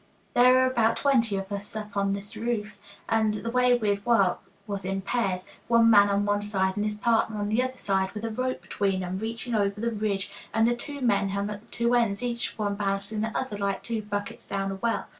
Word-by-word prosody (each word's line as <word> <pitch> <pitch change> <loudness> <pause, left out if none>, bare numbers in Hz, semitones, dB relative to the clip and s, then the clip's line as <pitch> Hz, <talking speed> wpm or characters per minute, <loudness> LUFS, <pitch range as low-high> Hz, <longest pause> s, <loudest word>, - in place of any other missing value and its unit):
There 250 +1 +6
were 260 0 +5
about 230 -3 +2
twenty 235 -7 +2
of 195 +1 -5
us 200 +1 -3 0.2
on 200 -1 +1
this 200 +2 -6
roof, 215 -2 -3 0.3
and 220 -1 +2
the 230 +2 -4
way 250 0 +4
we'd 205 -3 0
work 200 -6 +3 0.3
was 200 -3 -4
in 195 +1 -2
pairs, 195 -5 -1 0.2
one 230 -1 +5
man 205 -1 +7
on 200 0 +1
one 205 0 +1
side 190 -2 0
and 205 - -1
his 210 0 -2
partner 225 -1 +1
on 205 0 -2
the 220 +4 +2
other 255 0 -3
side, 190 -3 0
with 215 +1 -5
a 225 - -2
rope 255 -4 -2
between 190 +1 -1
'em, 185 +1 -3
reaching 230 +2 -4
over 200 -1 +1
the 235 +1 0
ridge, 205 -3 -2 0.2
and 225 0 +4
the 240 - +2
two 285 +3 -8
men 200 -5 +2
hung 200 +1 -2
at 205 0 -6
the - - -24
two 235 0 0
ends, 230 -2 +2
each 240 -1 -2
one 205 -2 -1
balancing 200 +1 -2
the 220 0 -2
other, 215 -6 -3
like 200 -1 -1
two 230 -2 -2
buckets 205 -1 -5
down 195 0 -2
a - - -3
well. 230 +3 -1
210 Hz, 230 wpm, -27 LUFS, 200-235 Hz, 0.3 s, man